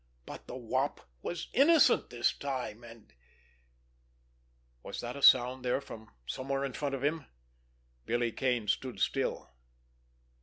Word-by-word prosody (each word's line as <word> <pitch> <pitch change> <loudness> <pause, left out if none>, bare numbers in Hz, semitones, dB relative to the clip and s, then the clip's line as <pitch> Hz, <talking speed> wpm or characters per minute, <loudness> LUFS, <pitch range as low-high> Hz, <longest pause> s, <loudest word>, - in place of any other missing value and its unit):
But - - -10
the - - -7
Wop - - -1 0.2
was 175 - -4
innocent 300 +3 +5
this 120 0 +1
time 125 -5 -4
and—— 115 -10 -14 1.7
Was - - -7
that 120 +1 -5
a 140 - -7
sound 130 -1 +6
there 125 +1 +1
from 110 -5 -11 0.2
somewhere 135 - -2
in 135 - -5
front 140 -2 -2
of 135 - -6
him? 150 0 0 0.8
Billy 120 0 +1
Kane 120 -3 0
stood 120 0 -1
still. 95 -2 -1
125 Hz, 130 wpm, -31 LUFS, 120-140 Hz, 1.7 s, sound